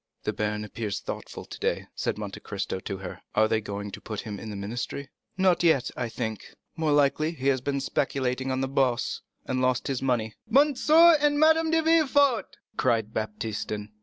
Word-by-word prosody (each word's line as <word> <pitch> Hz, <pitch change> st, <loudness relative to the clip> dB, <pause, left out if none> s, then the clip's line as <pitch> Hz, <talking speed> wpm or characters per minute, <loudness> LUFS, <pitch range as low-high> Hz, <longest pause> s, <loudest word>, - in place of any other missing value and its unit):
"The -, -, -1 dB
baron 105 Hz, 0 st, -2 dB
appears 105 Hz, -1 st, -4 dB
thoughtful -, -, -7 dB
today," -, -, -2 dB
said -, -, -2 dB
Monte -, -, -6 dB
Cristo 95 Hz, -, -4 dB
to 95 Hz, -, -5 dB
her; 95 Hz, -1 st, -8 dB
"are 110 Hz, 0 st, +5 dB
they 110 Hz, 0 st, +1 dB
going 100 Hz, -1 st, -5 dB
to -, -, -9 dB
put 110 Hz, -2 st, -5 dB
him 105 Hz, -3 st, -6 dB
in 110 Hz, -, -7 dB
the 105 Hz, -, -5 dB
ministry?" 120 Hz, +7 st, -5 dB, 0.3 s
"Not 185 Hz, -2 st, +3 dB
yet, 160 Hz, -7 st, +3 dB
I 125 Hz, -2 st, -3 dB
think. 110 Hz, -2 st, -5 dB, 0.2 s
More 160 Hz, -2 st, 0 dB
likely 145 Hz, +2 st, +2 dB
he 140 Hz, -3 st, 0 dB
has 130 Hz, -2 st, +1 dB
been 140 Hz, +1 st, -1 dB
speculating 130 Hz, -1 st, -1 dB
on 130 Hz, 0 st, -1 dB
the 135 Hz, -, 0 dB
Bourse, 130 Hz, -3 st, 0 dB, 0.2 s
and 130 Hz, -, -1 dB
has 130 Hz, 0 st, +1 dB
lost 135 Hz, -3 st, -2 dB
money." 120 Hz, -5 st, 0 dB, 0.2 s
"M. 285 Hz, +5 st, +5 dB, 0.2 s
and 310 Hz, -2 st, +6 dB
Madame 320 Hz, +1 st, +5 dB
de 325 Hz, 0 st, +2 dB
Villefort," 285 Hz, -6 st, +3 dB, 0.2 s
cried 110 Hz, -1 st, +1 dB
Baptistin. 105 Hz, -1 st, -4 dB
130 Hz, 185 wpm, -27 LUFS, 110-170 Hz, 0.3 s, and